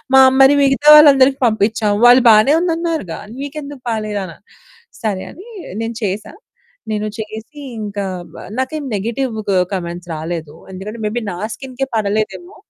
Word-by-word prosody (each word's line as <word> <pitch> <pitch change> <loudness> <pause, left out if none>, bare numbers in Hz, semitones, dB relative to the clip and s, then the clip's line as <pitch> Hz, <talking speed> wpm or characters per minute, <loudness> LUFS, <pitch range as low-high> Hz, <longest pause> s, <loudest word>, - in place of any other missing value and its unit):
మా 265 - +9 0.2
మరి 270 +2 +7
మిగతా 275 +2 +1
వాళ్ళందరికి 275 -3 +6
పంపించాము. 215 -1 0
వాళ్ళు 250 +1 +7
బానే 215 +7 +5
ఉంది 345 -2 0
అన్నారుగా. 325 - -3 0.2
నీకు 285 +2 -6
ఎందుకు 280 -2 -10
పలేదనా?" 210 -6 -4 0.7
సరే 200 -4 -2
అని 380 +7 -13 0.3
నేను 225 0 -4
చేశా. 200 +1 -3 0.6
నేను 215 0 -2
చేసి 220 +7 -8 0.2
ఇంక 205 -1 -6 0.4
వా - - -9 0.2
నాకేం 275 +4 -2
నెగెటివ్ 230 +4 -3 0.4
కామెంట్స్ 175 -1 -5
రాలేదు. 160 -1 -6 0.2
ఎందుకంటే 210 +5 -7
మే 210 - -1
బీ - - -1
నా 175 - -6 0.2
స్కిన్‌కే 265 0 -5
పడలేదేమో! 215 - -2
220 Hz, 140 wpm, -17 LUFS, 205-275 Hz, 0.7 s, మా